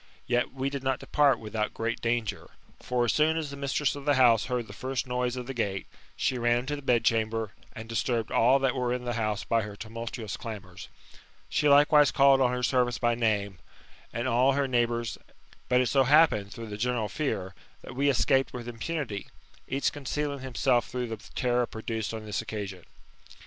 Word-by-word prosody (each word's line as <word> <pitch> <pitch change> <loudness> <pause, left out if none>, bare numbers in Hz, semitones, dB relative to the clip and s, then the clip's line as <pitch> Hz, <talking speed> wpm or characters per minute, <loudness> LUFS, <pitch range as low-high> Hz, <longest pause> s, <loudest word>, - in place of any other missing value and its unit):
Yet 120 0 0
we 135 +1 -3
did 140 -1 -4
not 130 -1 0
depart 145 -2 +3
without 110 0 -3
great 115 0 -2
danger. 115 -2 -2 0.3
For 125 -1 0
as 115 - +1
soon 155 +1 +3
as 155 -3 -3
the - - -6
mistress 140 +1 0
of 145 - -8
the 145 0 +3
house 120 -4 +5
heard 125 -2 -2
the 100 - -11
first 130 +4 -3
noise 125 0 -1
of 125 -1 -5
the 135 - -5
gate, 100 -5 -2 0.3
she 125 - 0
ran 120 0 +3
into 145 +4 -3
the 145 - -8
bedchamber, 115 -4 +1 0.2
and 110 0 -8
disturbed 115 0 -1
all 125 +4 +5
that 135 -2 +1
were 125 -1 -1
in 125 0 -2
the 120 - -1
house 110 -3 -1
by 115 0 +1
her 105 -1 -7
tumultuous 115 0 -6
damours. 95 -5 -8 0.6
She 150 - +2
likewise 145 0 +6
called 135 -2 +5
on 125 -1 +3
her 125 0 -2
servants 125 -1 +2
by 120 -1 +2
name, 105 -5 0 0.5
and 120 +2 -2
on 125 - 0
All 130 +3 +4
her 140 0 +1
neighbours; 120 -2 0 0.5
but 125 0 +4
it 125 - +1
so 135 +2 +3
happened, 140 -8 +4
through 115 +1 -8
the 105 - -6
general 120 -1 0
fear, 100 -10 -3 0.3
that - - -9
we 140 +2 +2
escaped 135 0 +2
with 120 -1 -6
impunity, 120 -3 -4 0.4
each 135 +1 0
concealing 145 0 -3
himself 130 -1 +1
through 125 -1 -4
the 110 - -4 0.2
terror 125 -1 +1
produced 110 -1 -4
on 110 -1 -6
this 105 +1 -2
occasion. 100 -5 -6
120 Hz, 195 wpm, -28 LUFS, 110-135 Hz, 0.6 s, likewise